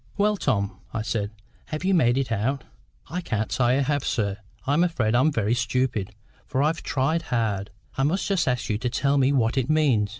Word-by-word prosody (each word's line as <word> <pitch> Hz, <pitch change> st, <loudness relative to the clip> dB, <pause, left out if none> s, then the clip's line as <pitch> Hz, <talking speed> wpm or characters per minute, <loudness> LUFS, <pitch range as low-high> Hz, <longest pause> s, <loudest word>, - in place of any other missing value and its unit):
"Well, 210 Hz, +1 st, +3 dB
Tom," 105 Hz, -, -1 dB, 0.2 s
I 110 Hz, -, -1 dB
said, 105 Hz, -3 st, -1 dB, 0.4 s
"have 155 Hz, +2 st, -5 dB
you 190 Hz, +1 st, +2 dB
made 125 Hz, -8 st, +4 dB
it 135 Hz, -3 st, -1 dB
out?" 115 Hz, +5 st, 0 dB, 0.5 s
"I 180 Hz, +2 st, -2 dB
can't 110 Hz, -9 st, -2 dB
say 125 Hz, +1 st, +3 dB
I -, -, +2 dB
have, 145 Hz, 0 st, 0 dB
sir. 100 Hz, -4 st, -1 dB, 0.3 s
I'm 145 Hz, +5 st, +3 dB
afraid 125 Hz, -11 st, +1 dB
I'm 130 Hz, +6 st, +4 dB
very 115 Hz, -4 st, +1 dB
stupid, 120 Hz, -4 st, -1 dB, 0.3 s
for 135 Hz, 0 st, 0 dB
I've 160 Hz, +3 st, +1 dB
tried 145 Hz, +5 st, 0 dB
hard. 110 Hz, -8 st, -1 dB, 0.3 s
I -, -, +3 dB
must 160 Hz, +8 st, +1 dB
just 195 Hz, -6 st, +1 dB
ask 125 Hz, -2 st, 0 dB
you 105 Hz, -1 st, -1 dB
to 125 Hz, -, -1 dB
tell 140 Hz, +3 st, +1 dB
me 135 Hz, +1 st, +4 dB
what 130 Hz, -1 st, +2 dB
it 130 Hz, -, -2 dB
means. 135 Hz, -10 st, +3 dB
130 Hz, 205 wpm, -25 LUFS, 110-150 Hz, 0.5 s, made